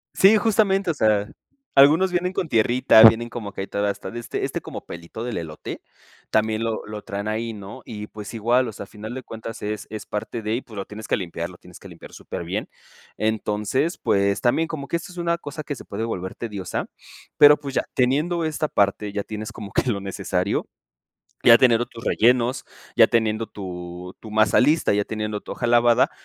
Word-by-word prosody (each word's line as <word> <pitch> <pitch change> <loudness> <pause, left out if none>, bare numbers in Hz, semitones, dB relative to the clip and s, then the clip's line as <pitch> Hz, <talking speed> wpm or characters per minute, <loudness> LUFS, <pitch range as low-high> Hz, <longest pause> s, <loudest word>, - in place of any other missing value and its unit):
Sí, 205 +3 +7
justamente, 200 -4 +2
o - - -3
sea, 105 -6 +2 0.5
algunos 155 +7 +6
vienen 180 +1 0
con 175 - -1
tierrita, 120 0 +5
vienen 115 +1 +7
como 105 -4 -6
que 95 - -6
ahí 95 - -4
toda 100 0 -1
esta 95 -1 -5
de 120 - -5
este 120 - -3
este - - -4
como - - -8
pelito 85 +7 -8
del 120 -6 -3
elote 80 -2 -7 0.5
también 110 +1 +1
lo 115 -1 -2
lo 105 0 -7
traen 100 +1 -5
ahí, 110 +1 -2
¿no? 105 +5 -9
Y, 105 -2 -6
pues 105 -1 -9
igual, 120 +3 +2
o - - -4
sea, - - -7
al 100 - -12
final 110 +3 -8
de 130 - -6
cuentas 115 0 -8
es 105 0 -4
es 110 0 -7
parte 105 +2 -4
de 110 +1 -1
y, 130 - -2
pues 110 - -14
lo 100 - -3
tienes 105 +1 -9
que - - +1
limpiar, 85 -2 -4
lo 90 - -13
tienes - - -15
que - - -12
limpiar - - -13
superbién. - - -5 0.5
Entonces, 110 - 0
pues 100 0 +1
también 160 +7 +2
como 145 -4 -5
que 170 - 0
esto 180 +2 -9
es 180 - -14
una 170 0 0
cosa 150 0 -7
que 145 - -4
se - - -10
puede 105 +3 -4
volver 95 -5 -4
tediosa, 100 -6 -4 0.5
pero 145 0 +8
pues 140 -1 -6
ya - - +1
teniendo 150 +7 +1
esta 155 -1 -1
parte, 100 -1 +1
ya 100 -1 -2
tienes 110 +1 -6
como 105 -2 -9
que 130 - +1
lo 100 - -2
necesario, 95 -1 -2 0.8
ya 115 -1 +9
teniendo 120 -1 +4
tus 115 - -12
rellenos, 125 +3 +2 0.3
ya - - +8
teniendo 110 -1 +1
tu 90 -3 -8
tu 110 - -10
masa 110 -1 +4
lista, 150 0 +3
ya 105 0 +1
teniendo 105 -1 -3
tu - - -7
hoja 120 - -3
lavada, 120 0 +4
110 Hz, 210 wpm, -23 LUFS, 105-130 Hz, 0.8 s, ya